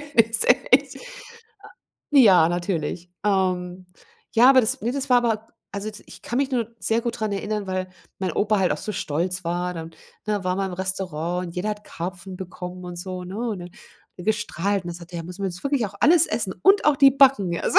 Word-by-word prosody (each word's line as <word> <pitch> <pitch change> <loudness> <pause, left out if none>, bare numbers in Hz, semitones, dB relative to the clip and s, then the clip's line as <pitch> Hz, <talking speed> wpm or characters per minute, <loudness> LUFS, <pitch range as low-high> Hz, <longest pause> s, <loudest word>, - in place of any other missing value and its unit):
der 230 -1 +7
ist 345 - +1
echt - - +3 1.2
ja, 190 - +7
natürlich. 175 -1 -3
Ähm, 185 -2 0 0.5
ja, 245 +4 +7
aber 260 -1 +7
das 220 - -1
ne, 235 +4 -1
das 275 -1 -4
war 250 - +7
aber 225 -2 -1 0.2
also 200 +2 -4
d 210 - -12
ich - - -13
kann 240 - -4
mich 275 -1 0
nur 230 -3 0
sehr 225 +1 +1
gut 235 -1 -3
dran 215 -2 -1
erinnern, 205 0 -3
weil 185 0 -3 0.3
mein 190 - -1
Opa 210 0 +1
halt 185 - +2
auch - - -2
so 215 - -5
stolz 180 +4 -2
war 175 +1 -2
dann, 165 0 -7 0.4
ne, 205 -3 -1
war 180 0 0
man 195 -1 -1
im - - -5
Restaurant 180 -2 -3
und 170 - -10
jeder 210 +4 -1
hat 210 0 -6
Karpfen 180 +2 -7
bekommen 180 -1 -8
und 175 -1 -7
so, 180 0 -6
ne, 185 +3 -7
und 230 -5 -2
dann 175 - -8
hat - - -23 0.4
er 180 - -8
gestrahlt 200 -2 -1
und - - -5
dann - - -6
sagte 175 0 -13
er: - - -3
„Ja, 165 - -6
müssen 180 +3 -8
wir 195 - 0
jetzt 180 +8 -9
wirklich 275 -6 +1
auch 200 - -12
alles 330 +2 +5
essen 205 -5 -2
und 395 +1 +5
auch 295 -2 +5
die 275 0 +7
Backen.” 255 -11 +4
Also, - - +4
190 Hz, 225 wpm, -23 LUFS, 180-225 Hz, 1.2 s, der